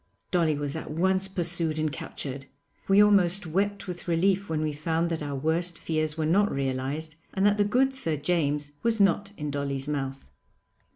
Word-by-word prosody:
Dolly 165 -4 +2
was 145 0 -3
at 160 - -5
once 190 +4 +1
pursued 170 -4 0
and 155 -1 0
captured. 135 -2 -6 0.4
We 195 +1 +6
almost 195 -2 +3
wept 200 +5 -1
with 180 -1 -7
relief 190 +4 +1
when 155 -1 -1
we 155 -1 -1
found 165 +3 -1
that 165 - -2
our 145 -1 -3
worst 165 +5 0
fears 155 -1 -1
were 160 - 0
not 200 +6 +3
realised 140 +4 -3 0.2
and 195 0 +2
that 205 0 +3
the - - +6
good 255 +6 +2
Sir 165 -12 +1
James 145 -2 0
was 230 -1 +1
not 200 +1 +3
in 150 -1 -3
Dolly's 140 -1 -2
mouth. 135 - -4
160 Hz, 180 wpm, -27 LUFS, 150-190 Hz, 0.4 s, We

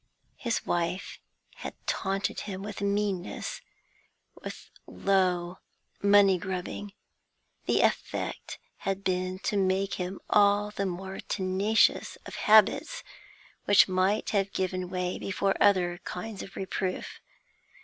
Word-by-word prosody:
His 235 -2 -2
wife 175 +2 -2 0.4
had - - -7
taunted 195 +1 -1
him 190 0 -5
with 210 0 -6
meanness, 200 - -2 0.7
with - - -9 0.2
low 185 -2 +1 0.4
money 200 -2 +6
grubbing; 190 +3 -5 0.7
the - - +3
effect - - -1 0.2
had 195 0 -3
been 185 0 -1
to 205 - 0
make 195 0 +1
him 180 +2 -4
all 205 0 +4
the 200 -2 -2
more 190 +1 -5
tenacious 200 +4 +1
of - - -8
habits 220 - +4 0.6
which 205 0 +6
might 190 +3 +1
have 200 -2 +1
given 185 -1 -2
way 180 0 -2
before 195 0 0
other 180 -3 +3
kinds 200 +3 -6
of 195 - -10
reproof. 190 -1 -3
195 Hz, 115 wpm, -28 LUFS, 185-205 Hz, 0.7 s, money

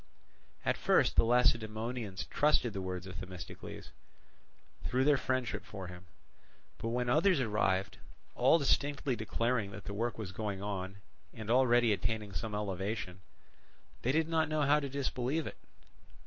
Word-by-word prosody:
At - - +2
first - - +3
the - - +6
Lacedaemonians 115 -2 +1
trusted 145 -6 +2
the 100 - -3
words 90 0 -4
of 95 -2 -7
Themistocles, 90 -2 -8 0.9
through 130 +1 +1
their 145 +1 +5
friendship 130 -5 -1
for 95 -3 -7
him; 90 0 -11 0.7
but - - -3
when 120 +1 0
others 160 +6 +4
arrived, 105 -4 0 0.3
all - - +5
distinctly 140 -2 +1
declaring 115 -1 0
that 100 0 -9
the 100 - -6
work 115 +3 -2
was 105 -4 -5
going 100 -1 -3
on 95 -1 -4 0.4
and 110 0 -4
already 120 -3 +5
attaining 105 +1 -2
some 105 +5 -3
elevation, 95 -2 -3 0.8
they 125 - +1
did 160 +2 +2
not 160 -1 +1
know 155 -1 +1
how 145 +2 +5
to 140 -2 -4
disbelieve 140 +2 -1
it. - - -7
115 Hz, 150 wpm, -33 LUFS, 100-130 Hz, 0.9 s, the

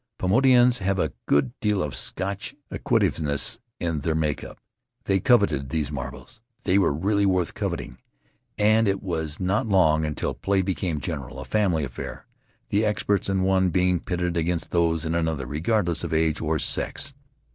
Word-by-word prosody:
Paumotuans 125 +4 +4
have 95 0 0
a - - 0
good 70 -3 +2
deal 105 -3 +1
of 75 - -4
Scotch 100 +1 -4 0.2
acquisitiveness 70 -3 0 0.2
in 85 -3 -1
their 80 +2 -1
make 75 -2 -1
up. - - -10 0.5
They 95 -1 +2
coveted 90 - +3
those 75 -1 -1
marbles 70 - -7
— 115 - -33
they 95 +2 +4
were 95 - +3
really 100 +7 +1
worth 90 -3 +1
coveting - - -4 0.3
— - - -42 0.2
and 110 +1 +4
it 100 -1 0
was 80 -4 -3
not 95 +6 0
long 80 -6 +4
until 75 -1 -2
play 95 -1 0
became 90 -4 -2
general, 70 -5 -5
a - - -7
family 95 -8 +1
affair, 60 -3 -7 0.4
the 105 +2 +2
experts 105 -2 0
in 95 -1 +1
one 95 -1 +3
being 90 0 +2
pitted 90 0 -2
against 85 0 -1
those 85 -2 +1
in 80 - -1
another, 80 -5 -1
regardless 85 - 0
of - - -3
age 80 -1 +1
or - - 0
sex. 140 0 -2
90 Hz, 170 wpm, -25 LUFS, 80-100 Hz, 0.5 s, Paumotuans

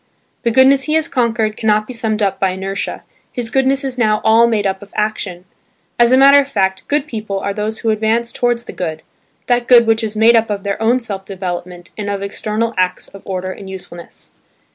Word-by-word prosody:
The 235 - +1
goodness 265 +3 +4
he 305 - -1
has 320 -1 +1
conquered 230 -4 0
cannot 215 -1 +1
be 255 - -8
summed 220 -2 -1
up 195 -1 -1
by 190 - +2
inertia: 190 +1 -4 0.3
his 240 -3 -3
goodness 270 +2 +1
is 260 -2 -3
now 215 -2 +2
all 225 +1 +5
made 215 -3 0
up 190 -1 -1
of 205 0 -13
action. 210 -4 -3 0.5
As 240 0 +5
a 260 - +6
matter 275 +1 +7
of 280 0 -1
fact, 190 -6 -1
good 295 -1 0
people 215 -7 -4
are 200 +1 -3
those 215 +2 -3
who 225 -2 0
advance 225 +2 0
towards 240 -1 -1
the - - -9
good–that 185 +8 -4
good 240 -2 +7
which 225 0 +2
is 215 -1 -3
made 225 +2 +5
up 225 -1 +2
of 200 -2 -3
their 200 +1 -3
own 235 +3 +3
self 200 -5 -5
development 180 -2 -6
and 205 -1 -3
of 200 -1 -3
external 215 +3 -2
acts 185 0 -1
of 195 - -13
order 185 -1 -4
and 195 0 -10
usefulness. 180 -2 -10
215 Hz, 210 wpm, -17 LUFS, 195-235 Hz, 0.5 s, matter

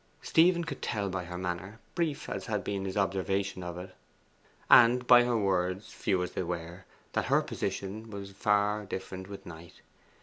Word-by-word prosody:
Stephen 170 +1 +4
could - - -6
tell 100 -2 -1
by 90 -1 -3
her 90 0 -6
manner, 90 +3 -4 0.2
brief 160 -5 -1
as 95 -1 -5
had 105 -4 -1
been 100 0 -3
his 95 +1 -3
observation 95 0 0
of 90 -1 -6
it, 90 +1 -8 0.7
and 125 +1 +7
by 120 0 +8
her 120 -1 +1
words, 95 -1 0
few 95 -3 0
as 90 - -4
they - - -3
were, 85 +1 -5 0.3
that - - 0
her - - +3
position 100 +3 -4
was 100 -2 -7
far 105 +1 +1
different 95 0 -6
with 100 - -9
Knight. 85 0 -12
95 Hz, 175 wpm, -30 LUFS, 90-105 Hz, 0.7 s, by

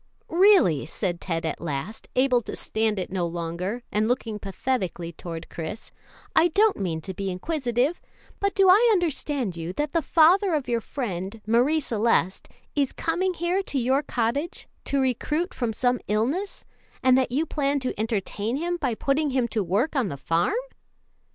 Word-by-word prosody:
"Really," 345 - +5
said 175 0 -3
Ted 165 -2 -2
at 160 - -3
last, 160 +6 -5
able 255 -1 +3
to - - -6
stand 220 -1 0
it 185 - -3
no 180 -2 0
longer, 175 +7 -4
and 215 +1 +1
looking 230 -3 -1
pathetically 190 -5 -3
toward 165 0 -7
Chris, 165 +6 -6 0.4
"I 335 - +6
don't 410 +5 +3
mean 165 -5 -2
to 190 - -5
be 195 +1 -3
inquisitive, 255 - -1 0.4
but 400 0 0
do 390 -1 +5
I 425 +6 +7
understand 290 - 0
you 170 +1 -5
that 295 +7 -2
the 335 - +2
father 345 +4 +4
of 290 -4 -2
your 235 -1 0
friend, 205 -5 -4
Marie 250 +8 +3
Celeste, 225 -6 +1 0.3
is 280 -3 +1
coming 360 +3 -1
here 345 +4 0
to 290 - -4
your 260 +3 +2
cottage 280 +4 -2 0.2
to 280 - +1
recruit 295 +7 0
from 240 -3 -1
some 245 +2 +1
illness, 260 - -1 0.4
and 255 -1 +6
that 260 -1 +2
you 295 +6 +1
plan 285 -2 0
to 255 - -2
entertain 220 +1 -2
him 345 +3 -1
by 255 -8 -1
putting 285 +5 +1
him 255 -3 +1
to 215 -1 0
work 205 - 0
on 260 -6 +2
the 140 - -5
farm?" 165 - +1
245 Hz, 170 wpm, -25 LUFS, 195-305 Hz, 0.4 s, I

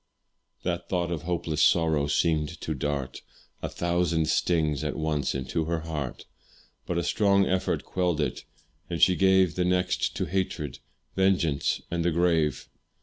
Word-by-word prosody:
That 85 -1 -3
thought 90 -2 0
of 80 -4 -2
hopeless 85 -2 -2
sorrow 80 -4 +3
seemed 80 +2 0
to 80 - -2
dart 70 -2 -3 0.4
A - - -3
thousand 85 -2 0
stings 80 -5 +1
at - - -2
once 75 -4 -1
into 65 +4 -2
her 85 0 -1
heart; 75 -5 -5 0.6
But 85 - -1
a 85 - 0
strong 100 0 +3
effort 95 0 -1
quelled 90 -4 0
it, 75 - -2 0.5
and - - -3
she 90 - +5
gave 95 -2 +4
The 90 - 0
next 90 0 0
to - - -1
hatred, 85 -7 -3 0.4
vengeance, 90 -7 +1
and 85 -1 0
the 85 - +2
grave. 80 -4 +1
85 Hz, 150 wpm, -27 LUFS, 75-90 Hz, 0.6 s, she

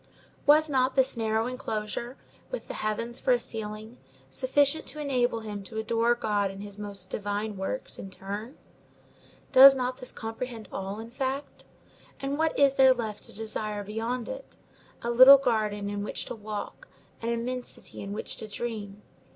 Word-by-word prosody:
Was 305 +2 +7
not 260 -2 +1
this 265 -1 +3
narrow 220 -1 0
enclosure, 240 0 -4 0.3
with - - -5
the - - -5
heavens 230 +3 -2
for 255 - +3
a 245 - +2
ceiling, 220 +1 -6 0.3
sufficient 280 - +2
to 305 - -6
enable 250 -5 0
him 210 -2 -5
to 220 - -7
adore 230 +2 +2
God 205 -4 0
in 195 +1 -8
his 205 0 -8
most 200 -3 -4
divine 205 +1 -2
works, 190 +7 -3
in 195 - -7
turn? 205 +7 -6 0.9
Does 270 +1 +10
not 255 -1 -2
this 250 - -4
comprehend 225 0 -6
all, 195 +2 -4
in 225 +1 -8
fact? 270 +2 -4 0.5
and 275 +2 -3
what 320 0 +1
is 275 -1 +4
there 265 -1 +7
left 220 -4 -4
to - - -5
desire 215 -1 -3
beyond 225 +4 -3
it? - - -8 0.5
A 235 - 0
little 255 +3 +10
garden 215 -6 0
in 205 0 -3
which - - -3
to - - -5
walk, 215 - -6 0.3
and 230 - -2
immensity 245 +2 -4
in 200 - -6
which 210 - -4
to 220 - -6
dream. 210 -2 -5
230 Hz, 165 wpm, -28 LUFS, 210-255 Hz, 0.9 s, Does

